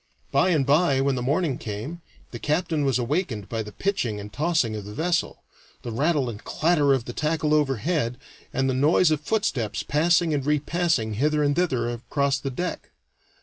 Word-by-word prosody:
By 185 - +3
and 155 -6 +2
by, 145 -1 +3
when 135 0 +2
the 125 - -2
morning 140 +1 0
came, 110 +11 -6 0.3
the 120 - -7
captain 155 +1 0
was 135 -2 +2
awakened 125 - -2
by 115 -1 -3
the 105 -1 -7
pitching 125 - -1
and 105 +1 -9
tossing 150 -6 +1
of 105 - -5
the 105 +1 -9
vessel, 170 +1 -1 0.4
the 120 - -5
rattle 145 +3 +1
and 115 -2 -7
clatter 155 -3 +2
of 130 -4 +1
the 120 - -6
tackle 155 +1 0
overhead, 140 -2 0 0.3
and 135 0 0
the 130 - +1
noise 155 +5 +4
of 155 -1 0
footsteps 140 - -1
passing 165 +2 +2
and 140 -2 0
repassing 150 -4 0
hither 150 +3 +2
and 145 0 +2
thither 130 -10 +1
across 140 +3 -1
the 135 - -3
deck. 175 +8 -4
145 Hz, 185 wpm, -25 LUFS, 120-160 Hz, 0.4 s, noise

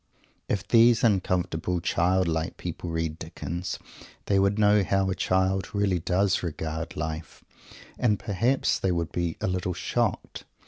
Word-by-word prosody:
If 100 - -1
these 115 0 +5
uncomfortably 90 -4 +1
"childlike" 85 -1 +1
people 85 0 -5
read 80 -1 -2
Dickens, 85 +1 -5 0.5
they 100 -1 +2
would 100 +1 +2
know 105 -1 +4
how 95 0 +1
a - - -1
child 95 0 +1
really 100 -3 +1
does 95 +4 +1
regard 80 +1 -4
life, 80 0 -5 0.6
and 110 -4 +2
perhaps 115 +7 +1
they 95 - +1
would 85 -2 -1
be 85 -2 -2
a - - 0
little 90 -1 -2
shocked. - - -2
90 Hz, 140 wpm, -26 LUFS, 85-100 Hz, 0.6 s, these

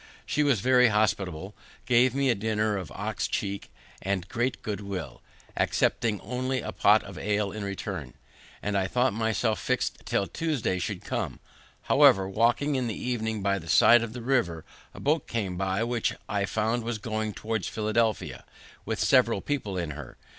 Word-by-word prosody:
She 150 - 0
was 140 -8 +3
very 125 +1 +5
hospitable, 100 -4 0 0.3
gave 125 0 +4
me 135 -2 +3
a - - +4
dinner 110 0 0
of 90 -6 -5
ox 100 -3 -2
cheek 100 -1 -3 0.3
with 95 -1 -1
great 120 +2 -1
good 105 -1 -3
will, 95 -9 -6 0.3
accepting 110 -4 +1
only 130 +2 -2
of - - -4
a - - -3
pot - - +4
of - - -9
ale 105 0 0
in 105 0 -5
return; 100 -1 -5 0.5
and 105 0 -1
I 95 -1 +1
thought 125 +3 +1
myself 110 0 0
fixed - - -1
till 100 - +1
Tuesday 120 - -1
should 90 - -4
come. - - -3 0.4
However, 95 -1 +5
walking 120 +8 +2
in 130 -3 0
the 110 - -3
evening 110 -4 -2
by 100 0 +1
the 85 -1 -11
side 120 +8 +7
of 115 -1 -4
the 120 -1 -7
river, 105 - 0 0.3
a - - -12
boat 150 +1 +1
came 100 -6 -2
by, 95 +3 0
which 120 -1 -1
I 100 -1 0
found 110 +3 -1
was 115 -1 -2
going 110 0 -3
towards 110 -2 -2
Philadelphia, 110 0 -1 0.4
with - - -2
several - - +4
people 115 -10 -3
in 85 -3 -2
her. 75 0 -9
110 Hz, 175 wpm, -27 LUFS, 100-120 Hz, 0.5 s, side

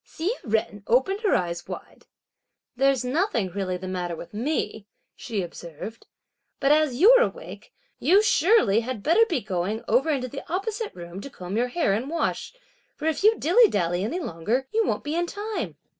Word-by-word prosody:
Hsi 335 +6 -3 0.2
Jen 220 -1 -1
opened 265 - +2
her 420 - +2
eyes 175 -1 -2
wide. - - -9 0.7
"There's 270 -1 +2
nothing 250 - 0
really 185 -1 -2
the 185 +1 -7
matter 180 -2 -3
with 170 - -10
me!" 220 -3 -2 0.3
she 215 -6 -3
observed; 175 +6 -9 0.5
"but 275 +1 +3
as 300 -4 +3
you're - - +8
awake, - - -4 0.3
you 395 +4 +4
surely 365 - +4
had 235 -3 -5
better 450 +9 +4
be 325 -9 0
going 200 +3 -2
over 255 +8 +2
into 265 -4 0
the 275 +3 -7
opposite 425 +4 -3
room 175 +2 -8
to 280 - -8
comb 185 -5 -7
your 240 +2 +1
hair 250 - +1
and 235 +7 -2
wash; 335 +1 -2 0.4
for 305 - -7
if 320 +3 0
you 435 +1 +5
dilly 405 - +5
dally 175 -1 0
any 250 - -2
longer, 235 - -2
you 450 +1 +2
won't - - -1
be 295 - -3
in 345 +1 0
time." 405 - -4
250 Hz, 180 wpm, -25 LUFS, -, 0.7 s, you're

